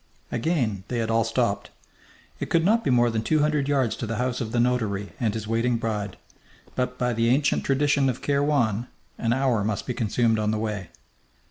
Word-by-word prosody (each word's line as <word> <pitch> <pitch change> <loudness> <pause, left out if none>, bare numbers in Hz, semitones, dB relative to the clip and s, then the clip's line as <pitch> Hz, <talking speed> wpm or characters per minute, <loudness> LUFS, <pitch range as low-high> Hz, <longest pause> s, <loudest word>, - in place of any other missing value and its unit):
Again 120 - 0
they 125 - -3
had 115 -1 -1
all 115 0 +3
stopped. 115 -2 -1 0.7
It - - -4
could 165 -1 +2
not 225 +4 +3
be - - 0
more 120 -2 +4
than 110 -1 -1
two 155 +6 +2
hundred 150 -2 +1
yards 135 -5 +1
to 115 - -4
the 115 - -2
house 125 +2 -1
of 110 -2 -3
the 120 - 0
notary 110 -5 0
and 115 -3 +1
his 110 -1 -4
waiting 115 +2 +1
bride, 105 -4 -3 0.6
but 125 0 -2
by 125 -1 0
the 115 +1 +1
ancient 140 +4 +2
tradition 140 0 +2
of 125 - -3
Kairwan 140 -6 +1 0.3
an 115 - 0
hour 125 -4 +2
must 105 -1 -2
be 125 - -2
consumed 115 -1 +1
on 105 0 0
the 110 - 0
way. 105 -4 -3
120 Hz, 205 wpm, -25 LUFS, 110-135 Hz, 0.7 s, more